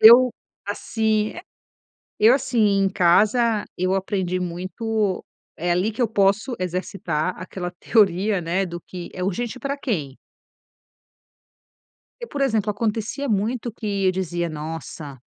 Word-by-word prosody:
Eu, 240 +3 +9 0.4
assim 215 +1 0
é 350 - -8 0.8
Eu 225 +4 +7
assim, 250 -3 -1
em 200 -2 +4
casa, 210 +5 +3
eu 185 +1 +1
aprendi 185 -2 -1
muito. 190 +3 -2 0.3
É 175 +2 -1
ali 185 +5 +1
que 245 - -1
eu 230 - +2
posso 210 +4 +2
exercitar 180 -2 -2
aquela 180 0 -5
teoria, 200 -2 +3
né. 175 +4 0
Do 175 0 -6
que 175 0 -8
é 180 - -4
urgente 235 +6 -2
para 280 +1 -2
quem? 160 - -3 2.0
E, 475 - -5
por 285 -10 -5
exemplo, 220 -6 +2
acontecia 225 +6 -2
muito, 225 +3 0
que 200 -3 -2
eu - - +5
dizia: 175 -2 -2
"Nossa, 150 -2 -6
200 Hz, 135 wpm, -23 LUFS, 180-225 Hz, 2.0 s, Eu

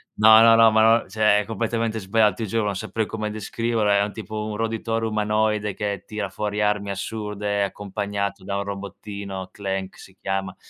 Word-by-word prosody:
no 110 +1 +8
no 115 0 +7
no 115 0 +7
ma 110 +1 +5
no, - - -16
cioè 105 -1 +3
è 105 - -2
completamente 115 0 -2
sbagliato 105 +2 +2
ti 115 - -4
giuro, 110 +2 0
non 100 -1 -1
saprei 110 +2 -2
come 105 -1 -4
descriverlo, 110 +1 -1
è 100 0 +4
un 105 - -3
tipo 110 -1 -5
un 110 -1 -4
roditore 115 +1 -1
umanoide 105 -1 0
che 100 -2 -3
tira 105 -2 -4
fuori 105 +2 -3
armi 105 -1 0
assurde 105 0 -2
accompagnato 100 0 -3
da 100 +1 -3
un 100 - -1
robottino, 100 -1 -7
Clank 95 -2 -4
si 95 - -14
chiama, 95 -1 -2
105 Hz, 185 wpm, -23 LUFS, 100-110 Hz, -, no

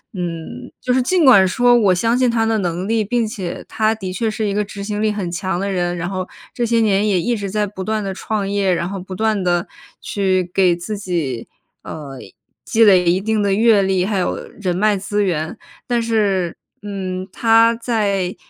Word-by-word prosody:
嗯， 170 -3 -6
就 250 - 0
是 260 - +3
尽 350 +7 +2
管 200 -8 +7
说 245 +6 +4
我 205 -6 +4
相 230 +6 +1
信 255 -1 +3
他 230 -1 +1
的 225 0 +1
能 180 0 -2
力， 225 0 +1
并 230 +2 0
且 190 -5 -5
他 220 0 +1
的 190 -4 -6
确 220 +5 -1
是 215 0 -2
一 200 - -1
个 210 +1 0
执 200 0 -8
行 210 0 -3
力 215 0 +2
很 200 -5 -3
强 185 0 -2
的 200 +1 -2
人， 175 -2 -1
然 175 +1 -3
后 185 -1 -4 0.3
这 240 - -1
些 230 0 +2
年 210 -2 +2
也 195 -3 +2
一 240 +6 0
直 200 -3 -4
在 210 +1 0
不 190 -1 -7
断 215 +1 -1
地 195 -1 -3
创 205 +1 -3
业， 200 -2 +1
然 170 0 -2
后 195 0 -5
不 185 +1 -8
断 215 -1 0
地 175 -1 0 0.3
去 190 -2 0
给 185 -3 +3
自 190 +5 -5
己， 160 - -3 0.3
呃， 140 -4 -8 0.4
积 225 - +3
累 185 -3 +5
一 180 +2 +2
定 215 +2 0
的 200 -1 +1
阅 220 -1 +4
历， 190 -1 +1
还 200 -1 -1
有 180 - -1 0.2
人 180 -3 -1
脉 210 +1 +3
资 205 +1 -1
源， 160 -5 -2 0.3
但 240 -1 +1
是， 205 -6 0 0.3
嗯， 190 -2 -4
他 230 +1 +4
在 205 -6 -1
200 Hz, 225 characters per minute, -19 LUFS, 185-220 Hz, 0.4 s, 管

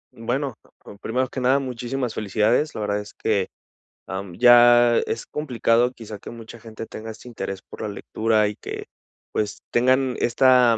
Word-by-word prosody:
Bueno, 125 +3 -2
p - - -26 0.2
p - - -16
primero 130 +3 0
que 130 - -6
nada 130 +2 +4
muchísimas 125 -1 -3
felicidades, 110 +8 +1
la 110 - -4
verdad 105 0 0
es 105 - -9
que, 100 -4 0 0.6
am, 95 -1 -5
ya 120 -1 +7
es 115 - -3
complicado 125 -4 +1
quizá 110 -4 -9
que - - -10
mucha 115 0 -10
gente 115 0 -8
tenga 110 0 -8
este 110 +3 -13
interés 95 -4 -5
por - - -12
la - - -3
lectura 110 +1 +1
y 105 - -4
que - - -7 0.5
pues 105 -1 -2
tengan 130 +1 +3
esta 125 -1 +4
115 Hz, 175 wpm, -23 LUFS, 110-125 Hz, 0.6 s, ya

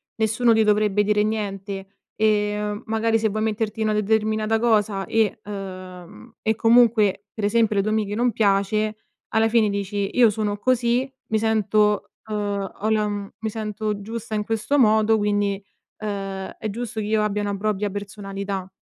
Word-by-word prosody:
nessuno 225 +2 +2
ti 220 - +4
dovrebbe 210 -1 +3
dire 210 0 +2
niente 200 -2 -3 0.3
e 210 -1 0
magari 225 +1 +1
se 220 0 +1
vuoi 215 +1 -2
metterti 220 0 -2
una 215 -1 +1
determinata 215 +1 +1
cosa 210 -4 +1
e 220 -2 +1
uhm, 185 +1 -9
e 220 0 +1
comunque 225 -4 +4
pre 215 - -3
esempio 215 -1 +2
le 195 - +3
tue 215 - -1
amiche 210 -1 -1
non 240 -1 +1
piace 210 +1 +1 0.3
alla 220 0 +3
fine 225 -2 +3
dici: 200 0 -2
"Io 240 -2 +7
sono 210 -1 -2
così, 245 +2 +1 0.2
mi 220 - +1
sento 215 -1 +1 0.2
uhm, 205 -2 -2
ho 215 - 0
la 215 -1 +2
m 205 -1 -4
mi 220 -1 -2
sento 215 -1 -3
giusta 225 +1 -5
in 210 - 0
questo 225 +6 0
modo, 220 -2 +4
quindi, 205 -1 0 0.4
uhm, 195 -2 -4
è 215 - -3
giusto 225 +1 -5
che 210 - -2
io 215 0 +1
abbia 210 0 -1
una 200 -1 -2
propria 210 0 -1
personalità." 195 -1 -5
210 Hz, 165 wpm, -23 LUFS, 205-220 Hz, 0.4 s, Io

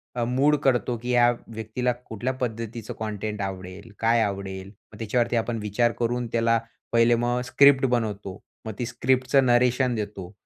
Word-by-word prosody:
अ, 120 - 0
mood 135 +5 +3
करतो 125 -2 +1
की 125 - -5
या 120 -1 +5 0.2
व्यक्तीला 110 +2 -2
कुठल्या 120 +4 -3
पद्धतीचं 115 -2 -4
कंटेंट 105 -1 -4
आवडेल, 95 +2 -6
काय 115 +1 +3
आवडेल. 95 -2 -3 0.3
मग - - -11
त्याच्यावरती 120 +2 0
आपण 115 0 -1
विचार 105 +3 +1
करून 120 +1 -1
त्याला 115 0 +2 0.3
पहिले 115 0 +4
मग 120 +1 0
स्क्रिप्ट 135 +1 +5
बनवतो, 105 -5 -2 0.3
मग 110 - -4
ती 120 - -1
स्क्रिप्टचं 130 +2 +2
नरेशन 125 +1 +3
देतो. 100 -4 -5
115 Hz, 155 wpm, -25 LUFS, 105-125 Hz, 0.3 s, या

